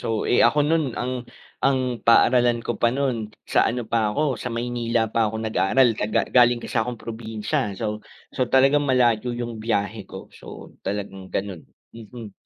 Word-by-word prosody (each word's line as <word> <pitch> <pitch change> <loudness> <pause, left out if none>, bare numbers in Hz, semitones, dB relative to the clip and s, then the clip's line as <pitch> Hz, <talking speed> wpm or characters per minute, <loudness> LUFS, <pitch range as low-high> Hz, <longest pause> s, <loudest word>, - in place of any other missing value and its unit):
So, - - -6 0.2
eh, - - +4
ako 150 - +1
no'n 160 -1 +2 0.2
ang 125 +1 -2 0.5
ang 135 -1 +3 0.2
paaralan 120 +1 +4
ko - - 0
pa 115 - +4
no'n 135 -3 0 0.4
sa - - +4
ano 120 +1 -2
pa 115 - +3
ako 135 +1 -1
sa 125 - -3
Maynila 120 0 -1
pa 115 -2 +2
'ko 110 - -5
nag-aral, 110 +3 +2
kaga 105 +1 +1
galing 120 -1 +6
kase 120 - -2
akong 120 +1 -3
probinsya. 110 -2 -4 0.2
So 105 -1 -3 0.3
so 130 -3 0
talagang 135 +2 +3
malayo 125 -2 +2
'yung 120 -2 -5
biyahe 105 -2 -2
ko, 95 - -10
so - - -16 0.4
talagang 95 -1 -5
gano'n. 95 -4 -3 0.3
Mhm. 115 -2 -10
115 Hz, 170 wpm, -23 LUFS, 110-125 Hz, 0.5 s, galing